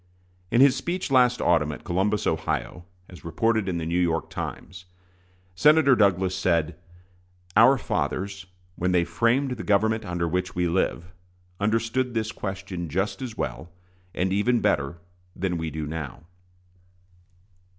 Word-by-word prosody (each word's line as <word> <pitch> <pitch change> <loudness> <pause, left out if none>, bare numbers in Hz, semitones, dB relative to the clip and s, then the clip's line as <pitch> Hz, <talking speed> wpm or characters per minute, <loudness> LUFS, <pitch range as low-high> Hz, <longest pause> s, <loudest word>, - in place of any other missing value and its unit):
In 120 +4 +3
his 135 -1 +6
speech 175 -1 -3
last 125 -2 +4
autumn 80 -3 +2
at 75 - -9
Columbus, 95 +4 0
Ohio, 80 +2 -2 0.2
as 90 - -14
reported 110 +5 0
in 90 - -2
the 80 - -3
New 85 +2 0
York 85 -2 -1
Times, 90 +1 -7 0.7
Senator 150 - +5
Douglas 95 -3 +2
said: 85 -4 0 0.8
"Our 125 +6 +7
fathers, 95 - -3 0.3
when 90 +1 0
they 90 -1 +3
framed 115 +11 +1
the 120 -3 -4
government 110 +2 +2
under 85 -3 -2
which 90 +2 -2
we 90 0 +1
live, 85 -1 -1 0.5
understood 115 +4 0
this 110 0 -1
question 95 -5 -5
just 95 - -2
as 120 -4 -6
well, 60 +7 -4 0.5
and 95 +1 0
even 120 +5 +2
better, 80 -8 0 0.4
than 90 -2 -2
we 80 -1 -3
do 80 -1 -5
now." 75 -2 -6
95 Hz, 140 wpm, -25 LUFS, 85-115 Hz, 0.8 s, Our